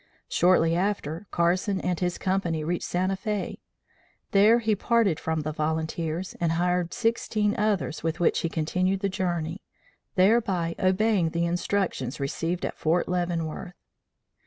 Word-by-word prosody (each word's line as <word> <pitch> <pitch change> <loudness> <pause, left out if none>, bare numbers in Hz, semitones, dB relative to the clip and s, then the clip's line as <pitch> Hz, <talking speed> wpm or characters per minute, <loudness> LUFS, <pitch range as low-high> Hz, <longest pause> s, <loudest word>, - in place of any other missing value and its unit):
Shortly 170 -2 +3
after, 185 -2 -2
Carson 185 +3 +1
and 180 -2 -1
his 180 -1 -1
company 180 -4 -1
reached 175 +3 -2
Santa 185 +2 0
Fe. 210 +1 -3 0.7
There 210 +4 +6
he 220 -2 +1
parted 210 -5 +2
from 160 -1 -1
the 155 +1 -3
volunteers 160 +3 -2
and 165 -1 +2
hired 175 0 0
sixteen 220 -2 0
others 205 -6 0
with 165 0 -2
which 175 - +3
he 165 - -1
continued 185 +4 0
the 200 - +1
journey, 175 -2 -2 0.5
thereby 190 -4 +3
obeying 190 -1 +2
the 170 +1 0
instructions 170 -6 -1
received 165 +5 -2
at - - -5
Fort 165 +3 +1
Leavenworth. 175 0 -2
180 Hz, 135 wpm, -26 LUFS, 165-195 Hz, 0.7 s, There